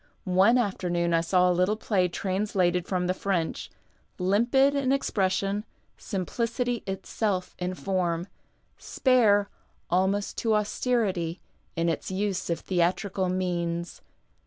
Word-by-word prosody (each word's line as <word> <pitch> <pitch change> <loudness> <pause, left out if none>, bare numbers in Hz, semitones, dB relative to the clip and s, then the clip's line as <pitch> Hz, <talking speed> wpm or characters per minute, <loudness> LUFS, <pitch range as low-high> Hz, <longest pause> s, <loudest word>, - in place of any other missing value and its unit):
One 190 +6 +4
after 200 -6 -1
noon 170 0 +1
I 165 - +4
saw 180 +2 +3
a 180 - +3
little 185 +4 +2
play 200 -4 +1
translated 185 -1 0
from 180 -2 -1
the 180 - +1
French, 185 -4 -2 0.5
limpid 240 +9 +3
in 275 -2 +1
expression, 200 -5 0 0.3
simplicity 230 +5 -2
itself 195 0 -2
in 180 +1 -2
form, 180 -3 -1 0.5
spare 220 -6 +3 0.4
almost 190 +3 +1
to 225 -2 +2
austerity 205 -6 0 0.4
in 165 +1 0
its 165 - -2
use 190 -1 -2
of 170 - -2
tluMtrical 185 +1 0
incans. 175 -2 -2
190 Hz, 120 wpm, -27 LUFS, 180-210 Hz, 0.5 s, One